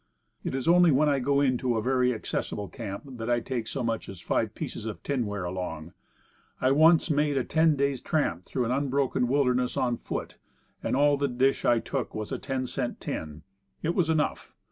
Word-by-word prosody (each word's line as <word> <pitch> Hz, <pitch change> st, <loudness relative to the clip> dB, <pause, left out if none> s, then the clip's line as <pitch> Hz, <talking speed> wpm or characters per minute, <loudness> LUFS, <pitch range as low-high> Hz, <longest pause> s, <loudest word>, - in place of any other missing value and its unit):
It -, -, -2 dB
is 135 Hz, +1 st, -3 dB
only 175 Hz, 0 st, +6 dB
when 150 Hz, +1 st, +4 dB
I 140 Hz, -1 st, +2 dB
go 140 Hz, +2 st, +2 dB
into 130 Hz, -3 st, +1 dB
a -, -, 0 dB
very 125 Hz, 0 st, +2 dB
accessible 105 Hz, -2 st, -3 dB
camp 100 Hz, -5 st, -6 dB
that 120 Hz, -4 st, -6 dB
I 120 Hz, 0 st, +3 dB
take 120 Hz, -1 st, -4 dB
so 135 Hz, -, -3 dB
much 115 Hz, -1 st, -2 dB
as 95 Hz, -, -8 dB
five -, -, -1 dB
pieces 110 Hz, -, -5 dB
of 110 Hz, -, -6 dB
tinware 105 Hz, -9 st, -2 dB
along. 90 Hz, -3 st, -5 dB, 0.7 s
I 130 Hz, -, +3 dB
once 160 Hz, +3 st, +5 dB
made 145 Hz, -1 st, +2 dB
a 130 Hz, -, +2 dB
ten 160 Hz, +2 st, +3 dB
days' 140 Hz, -2 st, 0 dB
tramp 90 Hz, -, -1 dB
through 125 Hz, -2 st, -1 dB
an 115 Hz, -, -1 dB
unbroken 135 Hz, -2 st, +1 dB
wilderness 125 Hz, -2 st, +1 dB
on 120 Hz, -2 st, +1 dB
foot, -, -, -5 dB, 0.4 s
and -, -, -1 dB
all 145 Hz, +1 st, +4 dB
the 140 Hz, 0 st, +1 dB
dish 130 Hz, +1 st, +1 dB
I 120 Hz, -, +5 dB
took 125 Hz, +2 st, -3 dB
was 110 Hz, -1 st, -4 dB
a -, -, -2 dB
ten 130 Hz, -2 st, -2 dB
cent 125 Hz, -1 st, -3 dB
tin; 75 Hz, -1 st, -5 dB, 0.4 s
it 165 Hz, -, +1 dB
was 175 Hz, -3 st, +1 dB
enough. 155 Hz, -2 st, -1 dB
130 Hz, 200 wpm, -27 LUFS, 115-140 Hz, 0.7 s, only